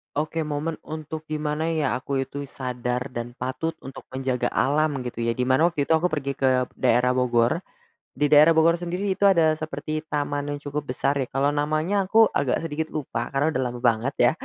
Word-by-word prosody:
Oke, 155 +2 -1
momen 150 +2 -3
untuk 155 0 -6
di 155 -1 -4
mana, 150 +1 -1
ya, 155 -4 0
aku 135 +1 -2
itu 140 +2 -5
sadar 125 -1 -3
dan 120 -1 -6
patut 130 +6 -3
untuk 135 - -10
menjaga 130 -1 -1
alam, 145 0 +1
gitu, 120 -2 -4
ya, 115 - +1
di 125 - -3
mana 130 +6 +3
waktu 145 -4 -2
itu - - +5
aku 165 - -1
pergi 145 -5 -2
ke 130 -2 +2
daerah 125 +1 +3
Bogor. 120 +3 +2 0.5
Di 145 +2 0
daerah 150 +2 +7
Bogor 165 +1 +4
sendiri 175 +3 -3
itu - - -3
ada 165 -6 +5
seperti 155 0 -4
taman 145 -1 -2
yang 145 - -4
cukup 145 0 -4
besar, 140 +1 -1
ya, 135 -3 -2
kalau 135 +1 +1
namanya 155 +7 +1
aku 220 +4 +5
agak 135 -9 0
sedikit 160 -1 -4
lupa 125 -5 -4
karena 145 +3 0
udah 130 - +1
lama 120 - -7
banget, 120 +2 +1
ya. - - +5
145 Hz, 200 wpm, -24 LUFS, 130-155 Hz, 0.5 s, daerah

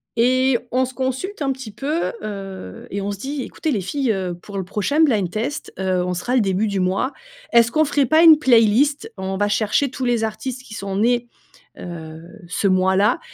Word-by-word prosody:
Et 255 +2 +3
on 255 +1 +2
se 255 - -9
consulte 265 +10 -3
un 275 -1 +1
petit 260 -5 -6
peu, 295 - -2
heu, 195 - -7
et 200 - -3
on 200 +1 -2
se 200 - -5
dit: 270 +5 -4
«Ecoutez 315 - -3
les 205 -6 0
filles, 260 +5 -1
heu, 185 -3 -2
pour 195 +3 -9
le 190 - -2
prochain 210 - -1
blind-test, 235 - 0
heu, 185 -1 0
on 180 - -2
sera 210 +8 -2
le 250 - +4
début 195 +1 +1
du 200 -2 -1
mois. 190 +9 0 0.4
Est-ce 235 0 +5
qu'on 310 0 +3
ferait 285 -1 +2
pas 315 +6 +4
une 315 -2 +9
playlist, 245 +2 +3
on 190 0 -3
va 205 - +1
chercher 215 +6 +1
tous 260 -1 -4
les 240 -2 +1
artistes 235 +4 -4
qui 225 - -12
sont 200 -3 -5
nés, 240 +3 +2 0.5
heu, 160 -2 -8 0.3
ce 180 +4 0
mois-là», 190 +2 +3
225 Hz, 200 wpm, -21 LUFS, 195-265 Hz, 0.5 s, une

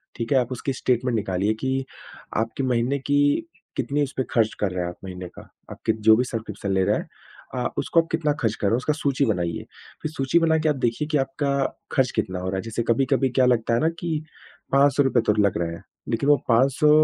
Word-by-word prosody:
ठीक 115 -1 -4
है? - - +5
आप 125 0 -2
उसकी 130 +2 -3
स्टेटमेंट 125 -1 0
निकालिए 100 0 0
कि 130 0 -1 0.5
आपके 115 +5 -1
महीने 125 +2 +1
की 145 - +2 0.3
कितनी 145 +1 0
उस 140 - -3
पे 130 - +1
ख़र्च 110 -2 +2
कर 100 -3 0
रहे 90 -1 -2
हैं 85 - -2
आप 90 - -9
महीने 90 -1 -6
का। - - -9 0.3
आपके - - -1 0.2
जो 110 - +9
भी 125 - +2
सब्सक्रिप्शन 105 -4 -4
ले 95 0 +3
रहे - - +2
हैं - - -6 0.5
अ, - - -1
उसको 165 - +3
आप 165 - -11
कितना 160 -2 +1
ख़र्च 110 -2 +1
कर 105 - -1
रहे - - +2
हो, 115 - +3
उसका 130 +4 0
सूची 140 -2 0
बनाइए। 90 -6 -1 0.4
फ़िर 155 - -3
सूची 135 +2 +2
बनाकर 160 -1 +2
आप 150 - +2
देखिए 130 +3 -1
कि 150 - +3
आपका 140 0 -1 0.4
ख़र्च 130 -3 +2
कितना 90 0 -1
हो 90 - -4
रहा 95 - -2
है। - - -1
जैसे 115 +1 -3
कभी-कभी 135 +2 +2
क्या 130 +1 +3
लगता 115 -2 +2
है - - +2
ना 160 - +3 0.8
₹500 135 -2 +4
तो 105 - +5
लग 100 - +2
रहे 85 -1 -2
हैं। 85 - -10 0.3
लेक़िन 120 +5 0
वो 145 - +6
₹500 130 +5 +4
125 Hz, 225 wpm, -24 LUFS, 110-140 Hz, 0.8 s, जो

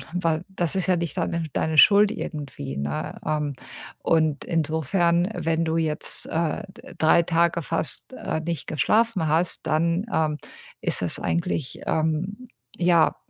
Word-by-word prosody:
weil 165 -2 0
das 180 -2 -2
ist 190 - +1
ja 185 - +3
nicht 170 -3 -3
dann 170 -2 -1
deine 160 0 0
Schuld 205 +3 +7
irgendwie, 135 - -6
ne? 75 +3 -3
Ähm, 150 -2 -1 0.5
und 155 -3 +2
insofern, 170 +2 +1
wenn 165 -1 0
du 160 0 0
jetzt, 155 -1 -2
äh, 165 +4 -1 0.4
3 160 +2 +5
Tage 170 0 +2
fast, - - -4
äh, - - -3
nicht 165 -2 -4
geschlafen 210 +2 +2
hast, 165 +3 0
dann, 170 +6 +1
ähm, 155 -2 +1 0.4
ist - - 0
es - - 0
eigentlich, 170 -5 -2
ähm, 165 +10 -1 0.3
ja, 175 -2 +3
165 Hz, 140 wpm, -24 LUFS, 155-175 Hz, 0.5 s, Schuld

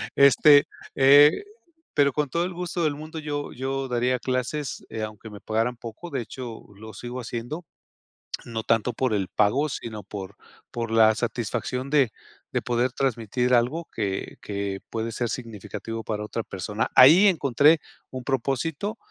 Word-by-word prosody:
Este, 145 +1 +7 0.3
eh, 145 - +7 0.5
pero 140 -2 +3
con 150 -3 -1
todo 170 +5 0
el 185 - -5
gusto 175 0 -3
del 150 -2 +1
mundo 155 +2 -7
yo 145 -1 -4
yo 135 +1 -3
daría 125 0 0
clases, 130 +2 -3
eh, 110 -1 -4
aunque 110 +1 -7
me 105 -1 -11
pagaran 115 +3 -1
poco, 120 +9 -9
de - - -2
hecho, 120 -1 -8
lo 110 +1 -11
sigo 120 +4 -6
haciendo, 120 +8 -5 0.8
no 115 -2 -4
tanto 115 +2 +1
por 125 0 -1
el 95 -3 -1
pago, 130 +9 +2
sino 110 -5 -6
por 100 -1 -8 0.3
por 115 -1 -4
la 110 -1 +5
satisfacción 125 +3 -3
de 140 -6 +3 0.4
de - - 0
poder 120 +1 0
transmitir 125 -1 0
algo 135 +8 +1
que 100 -3 -3
que 100 -1 -4
puede 115 0 -3
ser 120 0 -2
significativo 115 -1 -6
para 105 -1 -3
otra 110 +2 -4
persona. 105 +3 -3
Ahí 165 +11 +8
encontré 150 - +4 0.3
un 130 -1 -6
propósito 140 - -2
125 Hz, 155 wpm, -25 LUFS, 110-145 Hz, 0.8 s, Ahí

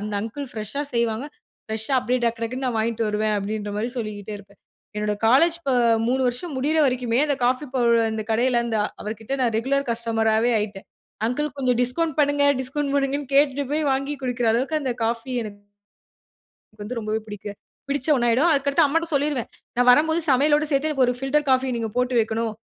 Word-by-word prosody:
அந்த 210 0 -5
அங்கிள் 250 +6 -5
ஃப்ரெஷ்ஷா 220 +6 -4
செய்வாங்க. 235 +2 0 0.4
ஃப்ரெஷ்ஷா 220 +4 -2
அப்படியே 250 0 0
டக் 230 0 -1
டக்குன்னு 255 +3 -3
நான் 245 -3 -1
வாங்கிட்டு 225 +1 0
வருவேன்." 210 0 0
அப்படின்ற 205 +1 -4
மாதிரி 225 +4 -2
சொல்லிக்கிட்டே 215 -3 -5
இருப்பேன். 200 0 -18 0.4
என்னோட 210 0 -1
காலேஜ் 325 +9 +4
இப்ப 275 -5 -1 0.4
3 260 +2 +1
வருஷம் 275 +6 -4
முடியிற 295 +5 +1
வரைக்குமே, 250 -2 0
அந்த 290 - +1
காஃபி 255 +4 +1
பவுடர் 235 -2 +3
அந்த 220 0 -3
கடையில, 240 +2 +2
அந்த 225 -2 -1 0.2
அவர்கிட்ட 220 +3 -6
நான் 240 -3 +1
ரெகுலர் 275 +3 0
கஸ்டமராவே 225 0 +1
ஆயிட்டேன். 205 -2 -5 0.4
அங்கிள் 295 +5 -2
கொஞ்சம் 250 -3 +1
டிஸ்கவுண்ட் 310 +5 -1
பண்ணுங்க 285 0 +2 0.2
டிஸ்கவுண்ட் 275 +2 -2
பண்ணுங்கன்னு 280 0 -1
கேட்டுட்டு 285 0 +3
போய் 305 +1 0
வாங்கி 275 +2 -1
குடிக்கிற 245 -2 0
அளவுக்கு 260 +7 0
அந்த 265 - -1
காஃபி 230 +3 -2
எனக்கு 205 -2 -9 1.1
எனக்கு 215 -1 -11
வந்து 240 +3 -4
ரொம்பவே 215 0 -2
பிடிக்க 210 0 -9 0.4
பிடிச்ச 280 0 -2
ஒன்னாயிடும். 245 +4 +3
அதுக்கு 280 -1 +1
அடுத்து 280 - +3
அம்மாட்ட 330 +4 +1
சொல்லிருவேன். 285 -4 0 0.3
"நான் 245 0 +3
வரும்போது 320 +6 +4
சமையலோடு 295 +3 +3
சேர்த்து 280 +2 +1
எனக்கு 275 -4 +2
ஒரு 245 - +2
பில்டர் 290 +2 +1
காஃபிய 260 0 +2
நீங்க 225 -1 -2
போட்டு 250 0 0
வைக்கணும். 225 0 0
250 Hz, 180 wpm, -23 LUFS, 225-280 Hz, 1.1 s, காலேஜ்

